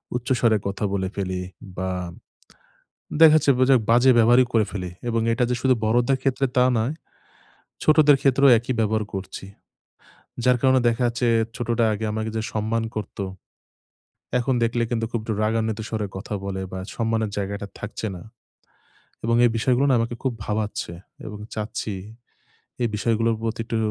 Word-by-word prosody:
উচ্চস্বরে 120 -2 +2
কথা 100 +1 -4
বলে 95 -1 -1
ফেলি 95 -2 -3 0.4
বা 95 0 -2 1.3
দেখাচ্ছে 155 -2 +7
বুজে 130 +1 +5
বাজে 125 +3 +6
ব্যবহারই 120 +3 +6
করে 110 -2 +3
ফেলি। 90 -3 -5 0.2
এবং 115 -1 +1
এটাযে 125 +1 +1
শুধু 130 -1 +3
বড়দের 120 +4 +2
ক্ষেত্রে 135 0 +1
তা 125 - +5
নয়, 115 +6 0 0.9
ছোটদের 155 -2 +6
ক্ষেত্রেও 140 0 +4
একই 120 +3 -3
ব্যবহার 110 0 +1
করছি। 95 0 -6 1.0
যার 125 -1 +4
কারণে 130 -1 +4
দেখা 115 +1 +1
যাচ্ছে 120 +1 -1 0.3
ছোটটা 120 -1 0
আগে 110 +1 -3
আমাকে 110 +1 -3
যে 110 - 0
সম্মান 110 +1 -1
করতো, 105 -1 -5 1.2
এখন 125 +1 0
দেখলে 115 +1 +1
কিন্তু 115 -1 -1
খুব 115 - -2
একটু 110 - -3
রাগান্বিত 110 0 0
স্বরে 110 -2 -2
কথা 100 +2 -5
বলে 95 -1 -3
বা 95 - -4 0.2
সম্মানের 115 -2 0
জায়গাটা 100 0 -3
থাকছে 105 +1 -5
না। 85 - -10 1.0
এবং 115 0 +2
এই 120 - +5
বিষয়গুলো 125 +4 +2
না - - +5
আমাকে 115 +1 -2
খুব 130 -2 0
ভাবাচ্ছে 105 -4 -3 0.3
এবং 105 -1 -7 0.2
চাচ্ছি 105 -1 -4 0.9
এই 120 - +2
বিষয়গুলোর 115 +1 +1
প্রতি 115 0 -2
একটু 115 0 -3
115 Hz, 150 wpm, -23 LUFS, 105-125 Hz, 1.3 s, দেখাচ্ছে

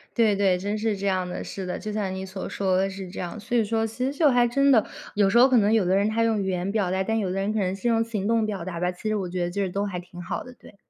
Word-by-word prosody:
对， 220 -4 +4
对， 195 -2 +3
真 205 +3 -2
是 215 -1 -1
这 200 +1 -2
样 185 -2 0
的。 - - -5
是 195 - -6
的， 180 - -3
就 215 - -5
像 200 -3 -2
你 190 0 -5
所 190 0 -6
说 190 -2 0
的 195 +1 +1
是 190 -1 -7
这 - - -8
样。 180 +5 -5
所 240 +3 -1
以 230 - +4
说 225 +1 0
其 225 +3 -3
实 275 +2 -3
就 310 -3 +5
还 245 -1 +4
真 275 +4 +3
的， 225 -5 +5 0.3
有 205 -1 +3
时 220 - +3
候 250 - +8
可 255 - +4
能 210 -1 +3
有 220 -4 +3
的 185 +2 +2
人 200 +2 +2
他 230 +1 +1
用 225 -2 +1
语 190 - -2
言 185 +1 -1
表 205 -4 0
达， 190 +1 0
但 225 +3 0
有 195 -4 -1
的 185 - -3
人 195 +2 0
可 220 - 0
能 185 -1 0
是 200 +5 -3
用 225 -1 +3
行 215 -4 -3
动 225 -1 +2
表 200 -5 -3
达 175 -2 -5
吧。 180 +1 0
其 180 +4 -7
实 215 - +1
我 190 -3 -2
觉 180 0 -2
得 175 - -2
就 200 +2 -2
是 190 - 0
都 200 +3 -2
还 185 -3 -4
挺 180 0 -11
好 180 +1 -4
的， 250 - -12
对。 235 - -17
200 Hz, 370 characters per minute, -25 LUFS, 185-225 Hz, 0.3 s, 候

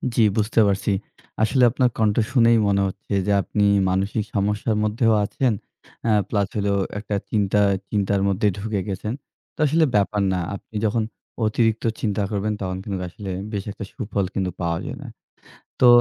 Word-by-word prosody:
জি, - - +4 0.2
বুঝতে 110 +1 +2
পারছি। 100 +1 0 0.5
আসলে 125 +4 +3
আপনার 125 0 +2
কণ্ঠ 105 -2 +2 0.2
শুনেই 115 -3 +5
মনে 100 0 +2
হচ্ছে 95 - -6
যে - - +2
আপনি 105 +1 -1 0.3
মানসিক 100 +3 0
সমস্যার 105 +2 0
মধ্যেও 110 +2 +2
আছেন। 125 +3 0 0.5
অ্যা 110 - +3 0.2
প্লাস 100 -3 +1
হলো 100 -1 +1 0.3
একটা 105 0 -3 0.2
চিন্তা 105 -1 +2 0.3
চিন্তার 100 -1 +1
মধ্যে 100 +2 +1
ঢুকে 105 0 -2
গেছেন। 100 +3 -3 0.4
তো - - -30
আসলে 160 +3 +3
ব্যাপার 105 0 +2
না। 90 - 0 0.2
আপনি 110 - -13
যখন 110 +1 +1 0.4
অতিরিক্ত 110 +1 +1 0.2
চিন্তা 105 -2 0
করবেন, 105 +1 -1
তখন 95 -1 -2
কিন্তু 95 -3 -4
আসলে 95 +3 -8 0.2
বেশি 100 -1 -4
একটা 100 - -7
সুফল 100 -5 -2
কিন্তু 95 -2 -1
পাওয়া 85 -1 0
যায় - - -5
না। - - -8 0.7
তো 125 - +6
105 Hz, 165 wpm, -23 LUFS, 100-110 Hz, 0.7 s, তো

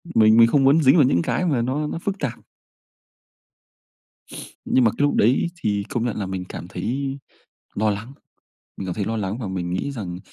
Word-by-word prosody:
Mình 110 0 +6
mình 115 - +8
không 135 +3 +2
muốn 145 +4 +5
dính 135 +3 +6
vào 150 - +6
những 85 -9 +2
cái 180 - -1
mà 140 -8 +1
nó 140 +5 -1
nó 165 - -4
phức 200 +2 -3
tạp. 125 -4 -3 2.3
Nhưng 130 - +3
mà 115 - +4
cái - - -5
lúc 145 - +2
đấy 120 +9 +3
thì 100 -1 0
công 120 -1 -2
nhận 120 - -2
là 105 - -2
mình 95 -1 -5
cảm 85 - -7
thấy 135 +7 -3 0.6
lo 110 +1 +1
lắng, 105 +6 -5 0.6
mình 95 - -6
cảm 90 - -3
thấy 100 - -2
lo 115 +2 -2
lắng 105 +1 -3
và 110 -6 -5
mình 90 -2 -3
nghĩ 95 +10 -2
rằng, 90 -8 -6
115 Hz, 210 wpm, -22 LUFS, 100-135 Hz, 2.3 s, mình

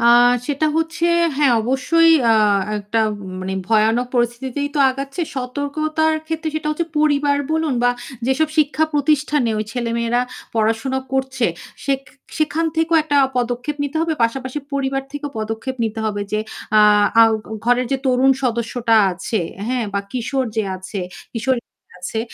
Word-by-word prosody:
আ - - 0 0.4
সেটা 295 +1 0
হচ্ছে, 325 +1 -1 0.3
হ্যাঁ, 285 -4 +4
অবশ্যই 300 +7 +3 0.2
আ - - +6 0.5
একটা 205 +3 -1 0.4
মানে 190 +1 -4 0.2
ভয়ানক 225 +3 +3
পরিস্থিতিতেই 245 +4 -1
তো - - -1
আগাচ্ছে। 275 +5 -5
সতর্কতার 305 +5 -1
ক্ষেত্রে 320 0 -3
সেটা 305 -1 -3
হচ্ছে 330 +2 -2
পরিবার 290 -1 +2 0.2
বলুন 320 -4 0
বা 245 - +4 0.4
যেসব 290 +4 +2
শিক্ষা 305 +1 +3
প্রতিষ্ঠানে 295 -3 +2
ওই 215 - -1
ছেলেমেয়েরা 235 0 0 0.3
পড়াশোনা 225 +4 0
করছে 265 -2 0 0.4
সেক 275 -1 0 0.4
সেখান 315 +2 +1
থেকেও 325 0 +2
একটা 295 -2 0 0.2
পদক্ষেপ 245 +4 -1
নিতে 285 +3 -4
হবে। 330 -1 0
পাশাপাশি 260 +4 -3
পরিবার 270 -1 -1
থেকেও 290 0 -5
পদক্ষেপ 225 +4 -4
নিতে 220 0 -3
হবে 205 -1 -2
যে 215 - +1 0.4
আ - - +7 0.4
আ - - +10 0.2
ঘ - - -14 0.2
ঘরের 245 +1 +2
যে 270 - +3
তরুণ 260 +1 +4
সদস্যটা 235 -1 +1 0.2
আছে, 190 +3 -2 0.3
হ্যাঁ? 250 -2 0
বা 200 - +1
কিশোর 255 +2 -1
যে 220 - +2
আছে 190 +2 -6 0.3
কিশোরী 245 +2 0
যে - - -66 0.3
আছে 220 +5 -3
265 Hz, 150 wpm, -20 LUFS, 235-295 Hz, 0.5 s, আ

